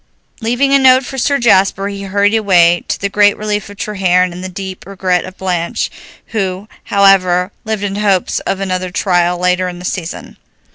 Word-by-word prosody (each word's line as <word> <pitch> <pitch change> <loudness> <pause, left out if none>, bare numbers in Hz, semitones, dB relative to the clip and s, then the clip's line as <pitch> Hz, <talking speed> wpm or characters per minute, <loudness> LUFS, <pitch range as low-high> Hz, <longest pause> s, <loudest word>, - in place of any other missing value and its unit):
Leaving 245 +5 +1
a 275 - +6
note 260 -1 +5
for 265 +1 -5
Sir 280 +3 +1
Jasper, 195 -5 +2
he 200 0 -6
hurried 200 +1 +1
away, 175 -6 +3
to - - -2
the 200 - -1
great 205 +1 +3
relief 210 -1 -3
of 205 - -12
Treherne 185 -3 +1
and 180 +1 -8
the 185 - -5
deep 190 0 -7
regret 185 -2 -1
of 185 +1 -11
Blanche, 175 -3 -2 0.4
who, 195 -1 -2 0.2
however, 190 -2 +3
lived 220 -2 -3
in 200 0 -3
hopes 200 -3 +1
of 195 - -3
another 185 -1 -2
trial 180 -1 +1
later 180 +1 0
in 175 - -8
the 180 - -9
season. 175 -2 -5
195 Hz, 185 wpm, -15 LUFS, 180-205 Hz, 0.4 s, a